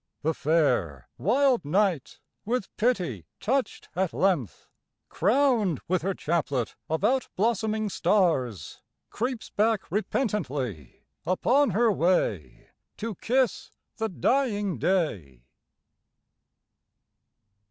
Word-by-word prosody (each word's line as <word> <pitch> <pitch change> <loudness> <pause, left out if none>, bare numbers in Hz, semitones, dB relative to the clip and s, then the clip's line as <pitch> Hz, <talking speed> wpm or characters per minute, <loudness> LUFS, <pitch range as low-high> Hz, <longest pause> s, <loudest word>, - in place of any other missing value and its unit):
The 160 +2 +1
fair, 125 - 0
wild 255 +1 +3
Night, 175 -1 0 0.2
with 235 -2 -3
pity 180 - -1
touched 265 +3 -1
at 185 -1 0
length, 170 - 0 0.4
Crowned 220 - +2
with 185 0 +1
her 190 +3 -1
chaplet 145 -7 -1
of 160 +4 -1
out 255 +4 +2
blossoming 215 +1 0
stars. 160 - 0 0.3
Creeps 245 +1 -3
back 215 -4 0
repentantly 145 - -2 0.2
upon 260 +10 +2
her 220 +3 +3
way 135 - 0 0.3
To 225 0 -4
kiss 250 +6 0 0.3
the 220 -1 -1
dying 205 - 0
Day. 105 - -1
190 Hz, 95 wpm, -27 LUFS, 150-225 Hz, 0.4 s, wild